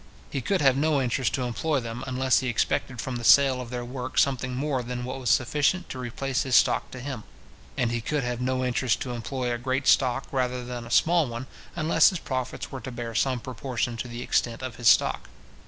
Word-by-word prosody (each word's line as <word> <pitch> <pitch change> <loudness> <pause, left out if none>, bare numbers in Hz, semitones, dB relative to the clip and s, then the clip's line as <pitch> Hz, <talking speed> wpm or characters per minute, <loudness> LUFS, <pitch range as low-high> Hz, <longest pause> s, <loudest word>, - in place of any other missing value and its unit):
He 135 - -2
could 190 +8 0
have 135 -2 +5
no 150 +1 +2
interest 130 0 0
to 130 - -2
employ 135 +5 -1
them, 115 +1 -6
unless 130 0 +2
he 130 - -3
expected 120 +1 -1
from 125 +2 -3
the 120 - -7
sale 135 +1 +6
of 120 - -8
their 120 -1 -4
work 130 +1 -6
something 130 -2 +1
more 135 -1 -1
than 125 0 -5
what 130 +1 -5
was 125 -3 -2
sufficient 150 +10 +2
to 130 - -6
replace 130 +2 -2
his 130 -2 +1
stock - - +3
to 130 - -9
him; 125 -4 -6 0.5
and 120 - +1
he 120 0 -1
could 145 +4 -1
have 125 0 -3
no 130 0 0
interest 125 -1 +1
to 125 - -3
employ 125 +1 -3
a 120 - -3
great 130 +2 -1
stock 130 0 +3
rather 125 -2 -1
than 120 -1 -6
a - - -11
small 165 +5 +3
one, 120 +2 -5 0.3
unless 165 -1 +4
his 185 - -3
profits 130 -5 -4
were 130 - -6
to 130 - -6
bear 120 -1 -5
some 130 +2 +1
proportion 125 -1 -3
to 125 - -4
the 120 +1 -6
extent 120 +1 0
of 130 -3 -5
his 120 - 0
stock. - - +4
130 Hz, 225 wpm, -26 LUFS, 120-135 Hz, 0.5 s, sale